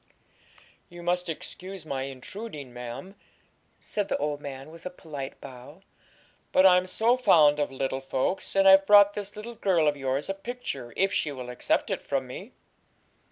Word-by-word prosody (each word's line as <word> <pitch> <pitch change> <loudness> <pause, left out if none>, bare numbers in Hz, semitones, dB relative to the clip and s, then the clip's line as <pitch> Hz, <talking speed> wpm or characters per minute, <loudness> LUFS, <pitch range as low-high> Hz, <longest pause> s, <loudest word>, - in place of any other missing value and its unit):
'You 175 -1 -11
must 180 0 0
excuse 185 +2 -7
my 135 -3 -3
intruding, 140 - -8
ma'am,' 125 +9 -7 0.7
said 205 -2 -3
the - - 0
old 145 0 -2
man, 135 +1 -8
with 165 0 -13
a - - -4
polite 150 -6 -8
bow; 125 -2 -12 0.7
'but 185 - +5
I'm 180 -1 +6
so 225 +6 +2
fond 150 -12 +5
of 145 - 0
little 135 0 -2
folks, 135 +9 -2
and 195 0 +5
I've 195 0 +7
brought 205 0 +8
this 205 0 -6
little 220 +3 -7
girl 185 -8 +2
of 145 - +2
yours 135 +1 -2
a 195 - -1
picture, 195 - -6
if 195 +1 +2
she 150 - 0
will 125 -3 -7
accept 125 - 0
it - - -2
from - - -2
me.' - - -9
165 Hz, 170 wpm, -27 LUFS, 135-195 Hz, 0.7 s, brought